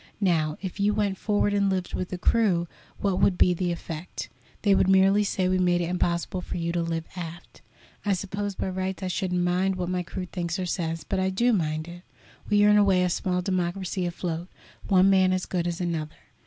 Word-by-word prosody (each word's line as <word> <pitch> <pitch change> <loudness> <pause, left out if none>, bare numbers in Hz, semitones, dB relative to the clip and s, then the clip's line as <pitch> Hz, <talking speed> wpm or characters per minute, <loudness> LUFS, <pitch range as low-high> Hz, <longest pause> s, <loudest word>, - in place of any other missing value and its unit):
Now, 160 -6 +1
if 190 +1 -5
you 205 +1 +2
went 200 -3 0
forward 205 -1 +1
and 200 -1 +2
lived 185 -2 -2
with 185 - -3
the 180 - -4
crew, 180 -4 +2 0.3
what 195 -2 +1
would 185 - +3
be 180 - +5
the 175 0 -1
effect? 170 0 -6 0.3
They 205 -2 +5
would 190 - +3
merely 195 +2 +5
say 190 -2 0
we 185 0 +1
made 175 -1 +3
it 175 0 -1
impossible 175 0 -1
for - - -5
you 170 0 -1
to 170 0 0
live 165 -1 -2
aft. 175 -1 -8 0.4
I 205 - +2
suppose 200 +2 -3
by - - -2
rights 190 +1 -3
I - - -1
shouldn't 180 0 -1
mind 185 +2 +1
what 180 -1 -3
my 180 0 0
crew 180 +1 -5
thinks 175 0 -3
or 185 - -2
says; 165 -2 -2
but 195 - -2
I 190 0 +1
do 235 +6 +2
mind 155 -4 -1
it. 175 0 -10 0.5
We 205 0 +5
are - - +6
in 210 - +6
a 205 - +6
way 190 -2 +3
a 180 - +1
small 180 +1 -1
democracy 185 0 -1
afloat, 170 0 -4 0.4
one 190 -1 +5
man 190 -1 +4
as 185 0 -1
good 175 -2 -1
as 175 -1 -3
another. 165 -4 -3
185 Hz, 220 wpm, -26 LUFS, 175-195 Hz, 0.5 s, are